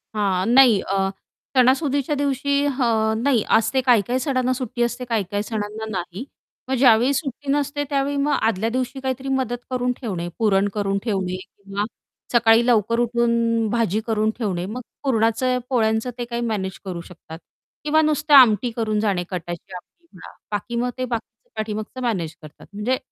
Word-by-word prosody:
हां. 190 -3 +1
नाही, 250 -6 +7
अ, 195 0 0 0.5
सणासुदीच्या 275 +3 +2
दिवशी 280 0 0
हं, 230 -5 +1
नाही 255 -6 +3
असते 260 +4 +1
काही 245 -4 +4
काही 250 +2 0
सणांना 255 -2 0
सुट्टी 255 -2 -4
असते 240 +1 -2
काही 230 -4 0
काही 205 0 -1
सणांना 215 0 -4
नाही, 185 +2 -5 0.4
मग 265 - 0
ज्यावेळी 245 +1 +5
सुट्टी 275 0 -3
नसते 290 0 0
त्यावेळी 280 0 0
मग 285 +1 +1
आदल्या 225 0 +1
दिवशी 255 +2 -3
काहीतरी 265 0 -3
मदत 260 -3 0
करून 250 0 0
ठेवणे, 185 -8 -3
पुरण 200 -3 +3
करून 200 -2 -1
ठेवणे 190 -5 -1
किंवा 200 +1 -6 0.5
सकाळी 230 0 +5
लवकर 230 -1 +2
उठून 235 -1 +1
भाजी 220 -2 +1
करून 215 -1 +1
ठेवणे, 190 -7 -2
मग 225 +6 -5 0.2
पुरणाचं 250 0 +1
पोळ्यांचं 220 -1 +1
ते 240 - -3
काही 235 0 -4
मॅनेज 205 -5 -3
करू 180 -3 -5
शकतात 165 -2 -11 0.4
किंवा 305 +1 +3
नुसत्या 300 -1 +4
आमटी 240 -2 +6
करून 220 -2 -1
जाणे 200 -4 0
कटाची 175 +1 -6
आमटी 335 - -13
म्हणा - - -12 0.2
बाकी 210 +3 -3
मग 245 +1 0
ते 255 - -1
बाकीचं 245 - -6
पाठीमागचं 215 +3 -4
मॅनेज 180 -10 -2
करतात 155 -1 -13
म्हणजे 220 +6 0
230 Hz, 165 wpm, -22 LUFS, 210-255 Hz, 0.5 s, नाही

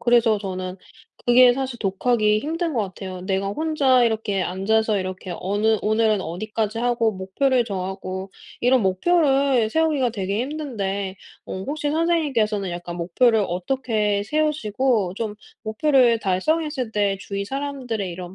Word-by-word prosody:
그래서 235 -3 +3
저는 185 -2 -5 0.5
그게 245 0 +7
사실 260 -3 -4
독학이 210 +1 +1
힘든 330 +1 -2
것 235 - +1
같아요. 185 -1 -7
내가 190 +1 -1
혼자 275 -1 +2
이렇게 220 -4 0
앉아서 210 +3 +1
이렇게 185 -1 -5
어느 210 +3 +1
오늘은 215 -1 +2
어디까지 215 +5 -3
하고 235 -2 +1
목표를 240 +7 +1
정하고 190 -1 -5 0.3
이런 250 -1 +3
목표를 270 - +2
세우기가 300 -5 +2
되게 200 -1 -2
힘든데 205 -10 -3 0.3
어 190 - -5
혹시 295 0 -2
선생님께서는 270 - +1
약간 175 0 -6
목표를 220 +7 +2
어떻게 210 +1 -1
세우시고 255 -8 0
좀 210 0 -4 0.3
목표를 240 +1 +3
달성했을 255 - -1
때 205 -2 +1
주위 200 0 -4
사람들의 260 -6 -3
이런 180 +1 -8
220 Hz, 325 characters per minute, -23 LUFS, 195-260 Hz, 0.5 s, 그게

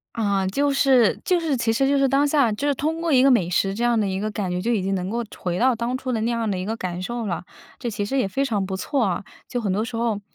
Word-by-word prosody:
啊， 200 -4 0
就 280 +9 +1
是 265 -5 +4
就 360 -2 +2
是 300 -6 0
其 230 -1 +1
实 270 +4 +2
就 280 - +3
是 275 -1 +3
当 275 +2 +3
下 285 -5 +3
就 215 +7 -3
是 285 - +3
通 315 +5 -2
过 335 - 0
一 255 -3 +5
个 275 - +5
美 190 -9 +3
食 195 +2 +1
这 235 - -2
样 240 -2 +3
的 205 - +1
一 190 0 -2
个 215 +2 -2
感 200 -3 -3
觉， 180 0 -2
就 235 +5 0
已 210 -5 +1
经 195 +1 -1
能 185 +1 -3
够 235 +1 -2
回 175 -1 -2
到 255 0 +3
当 235 +3 -2
初 260 0 -6
的 220 - -1
那 235 +2 0
样 230 -2 -1
的 190 - -1
一 185 - -3
个 220 +3 -3
感 180 -2 -4
受 235 +3 -4
了， 180 -3 -3 0.4
这 240 - -3
其 205 -1 -2
实 270 +6 -2
也 255 - +2
非 270 +9 -1
常 205 -6 -1
不 190 0 -4
错 270 +5 0
啊。 190 -1 -1 0.3
就 245 - -2
很 200 -5 -1
多 210 - 0
时 230 0 -5
候， 225 -3 -1
230 Hz, 335 characters per minute, -23 LUFS, 195-265 Hz, 0.4 s, 一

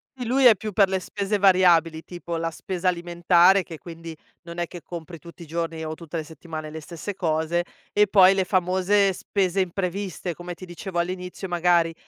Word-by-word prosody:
Sì, 250 - -6
lui 260 +3 +2
è 230 - +9
più 215 +2 -6
per 195 -1 +4
le 190 - 0
spese 200 +2 -2
variabili, 175 -4 +4
tipo 170 -1 -6
la 165 0 -1
spesa 185 +2 -4
alimentare, 175 +2 +4
che 165 -2 -9
quindi 165 -1 -10 0.3
non 170 0 -9
è 175 - 0
che 175 0 -10
compri 170 -1 -8
tutti 170 +1 -12
i - - -11
giorni 165 0 -4
o 155 - -4
tutte 165 0 -7
le 160 - -3
settimane 155 0 -8
le 160 0 -7
stesse 170 +5 -6
cose. 165 -1 0 0.3
E 210 0 +4
poi 190 -1 +6
le 195 -1 +1
famose 190 +2 +2
spese 190 0 -1
impreviste, 185 0 -3
come 175 +2 -8
ti 185 - -10
dicevo 175 +1 -7
all'inizio, 180 +2 -3
magari 175 -1 +2
175 Hz, 195 wpm, -24 LUFS, 165-190 Hz, 0.3 s, è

